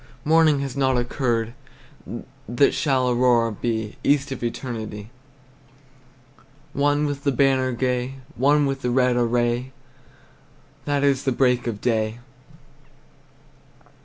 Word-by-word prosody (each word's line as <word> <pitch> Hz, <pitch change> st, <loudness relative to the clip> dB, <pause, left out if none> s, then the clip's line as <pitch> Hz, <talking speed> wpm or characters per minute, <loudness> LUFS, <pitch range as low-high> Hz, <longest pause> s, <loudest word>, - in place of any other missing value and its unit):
Morning 155 Hz, -2 st, +4 dB
has 135 Hz, -3 st, -4 dB
not 130 Hz, -2 st, +1 dB
occurred! 120 Hz, -2 st, -1 dB, 1.0 s
That 130 Hz, +4 st, +3 dB
shall 130 Hz, -4 st, +1 dB
aurora 120 Hz, -2 st, +3 dB
be 110 Hz, 0 st, -3 dB
East 140 Hz, -1 st, +2 dB
of 130 Hz, -, -5 dB
eternity; 115 Hz, -3 st, -5 dB, 1.6 s
One 145 Hz, +1 st, +1 dB
with 145 Hz, -1 st, -4 dB
the 140 Hz, -, +2 dB
banner 130 Hz, 0 st, +2 dB
gay, 125 Hz, +1 st, -2 dB, 0.2 s
One 145 Hz, +3 st, +3 dB
in 135 Hz, 0 st, -1 dB
the 125 Hz, -, -2 dB
red 125 Hz, 0 st, +2 dB
array, 120 Hz, +1 st, 0 dB, 1.1 s
That 145 Hz, -1 st, 0 dB
is 140 Hz, -2 st, +2 dB
the 135 Hz, -, +1 dB
break 125 Hz, -1 st, +1 dB
of 105 Hz, -3 st, -4 dB
day. 110 Hz, -2 st, 0 dB
125 Hz, 115 wpm, -23 LUFS, 120-140 Hz, 1.6 s, Morning